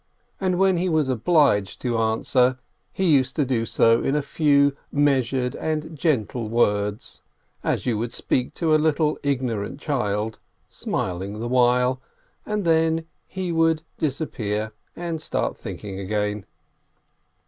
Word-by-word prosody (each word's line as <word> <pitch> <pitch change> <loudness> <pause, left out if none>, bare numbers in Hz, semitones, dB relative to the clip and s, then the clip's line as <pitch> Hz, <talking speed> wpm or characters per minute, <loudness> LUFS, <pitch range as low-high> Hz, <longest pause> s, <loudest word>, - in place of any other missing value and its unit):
And 185 -2 0
when 190 -1 +3
he 180 +2 0
was 155 -4 +1
obliged 130 - +2
to 120 -3 0
answer, 125 +3 +2 0.3
he 190 - -3
used 130 -2 +2
to 145 - +1
do 120 -3 0
so 115 0 +4
in 135 - 0
a 150 - +1
few 140 -1 +3 0.2
measured 135 -3 +1
and 155 0 -3
gentle 125 - -1
words, 105 -2 0 0.4
as - - -1
you 115 -4 0
would 115 +1 -3
speak 125 -1 -1
to 160 -2 +1
a 155 - +4
little, 155 0 +1
ignorant 130 -4 -2
child, 110 -7 -2 0.3
smiling 95 +3 -4
the 120 - -3
while, 125 +1 +3 0.5
and 210 -2 -1
then 160 0 +2 0.2
he 185 -2 -4
would 165 -1 +2 0.2
disappear 110 -8 -2 0.2
and 170 -2 -4
start - - -2
thinking 95 -2 -7
again. 105 +1 -2
130 Hz, 135 wpm, -24 LUFS, 110-155 Hz, 0.5 s, so